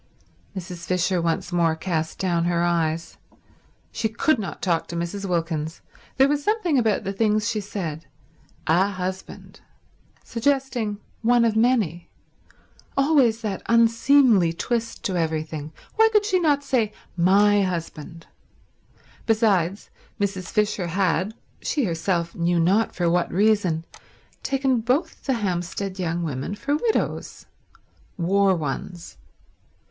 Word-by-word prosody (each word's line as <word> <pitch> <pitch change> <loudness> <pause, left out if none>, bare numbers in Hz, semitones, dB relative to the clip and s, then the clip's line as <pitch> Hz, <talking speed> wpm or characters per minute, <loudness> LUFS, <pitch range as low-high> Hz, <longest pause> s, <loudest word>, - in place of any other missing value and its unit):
Mrs. 175 -2 -7
Fisher 180 0 +1
once 165 +1 -1
more 170 -2 +2
cast 160 -2 -3
down 170 -3 0
her 170 0 +1
eyes. 165 -1 -1 0.7
She 225 -1 -1
could 235 +5 +1
not 200 - -5
talk 170 -3 0
to 170 - -6
Mrs. 185 +4 -3
Wilkins. 165 -2 -2 0.4
There 270 +1 +6
was 290 0 0
something 365 - +1
about 220 -3 +1
the 195 0 -3
things 215 +1 +1
she 215 - -1
said... 170 -6 -5 0.6
"A 175 +5 +3
husband." 185 -1 -6 0.6
Suggesting 240 -4 -1 0.2
one 235 +1 +4
of 225 -2 +1
many. 220 -8 +1 0.9
Always 275 -6 +3
that 205 -4 -3
unseemly 230 -4 +4
twist 230 +6 -3
to 190 - -1
everything. 155 -2 -3 0.3
Why 445 0 +6
could 425 -1 +3
she 375 -3 +2
not 295 -4 +2
say 225 -6 0 0.2
"My 200 +4 +4
husband"? 165 -3 -4 1.0
Besides, 205 -4 +1 0.3
Mrs. 195 -2 -2
Fisher 210 -4 0
had, 185 +3 0 0.3
she 290 - -1
herself 170 -2 -1
knew 170 0 +1
not 195 +7 +2
for 175 -1 0
what 175 +1 +1
reason, 190 -5 +2 0.6
taken 270 -2 +1
both 275 +9 -1
the 270 - +1
Hampstead 190 -2 -3
young 170 -1 -1
women 145 +4 -3
for 285 +7 -1
widows. 445 +9 -2 0.7
War 195 +2 +3
ones. 165 +3 -5
195 Hz, 125 wpm, -24 LUFS, 170-230 Hz, 1.0 s, There